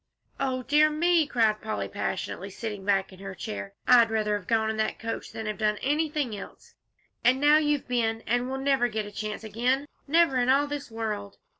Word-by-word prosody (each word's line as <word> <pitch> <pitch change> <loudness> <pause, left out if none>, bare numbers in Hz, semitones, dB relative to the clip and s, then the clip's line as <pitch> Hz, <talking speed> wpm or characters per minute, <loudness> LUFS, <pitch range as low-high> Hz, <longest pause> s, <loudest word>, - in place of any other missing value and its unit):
"O 255 -1 -1
dear 300 +4 +4
me!" 330 0 +2
cried 220 -5 +2
Polly, 220 0 -3
passionately, - - -4
sitting 210 -4 -6
back 195 -1 +1
in 185 - -14
her 195 0 -7
chair, 100 - -6
"I'd 235 -2 +7
rather 215 -1 0
have 205 -3 -6
gone 220 -1 +2
in 220 - -5
that 220 - -1
coach 225 0 -5
than 220 - -6
have 215 0 -4
done 210 -1 +1
anything 295 -4 0
else, 195 - -11 0.5
and 250 +2 +4
now 295 +2 +6
you've 295 -2 0
been, 225 -2 0
and 245 +2 0
we 265 - -2
never'll 270 -3 +2
get 215 -1 -3
a 205 - -9
chance 215 +1 -5
again. 245 +6 0 0.2
Never 310 -3 +4
in 245 +1 +1
all 275 +2 +4
this 290 -1 -5
world!" 210 -3 -4
230 Hz, 200 wpm, -27 LUFS, 215-275 Hz, 0.5 s, I'd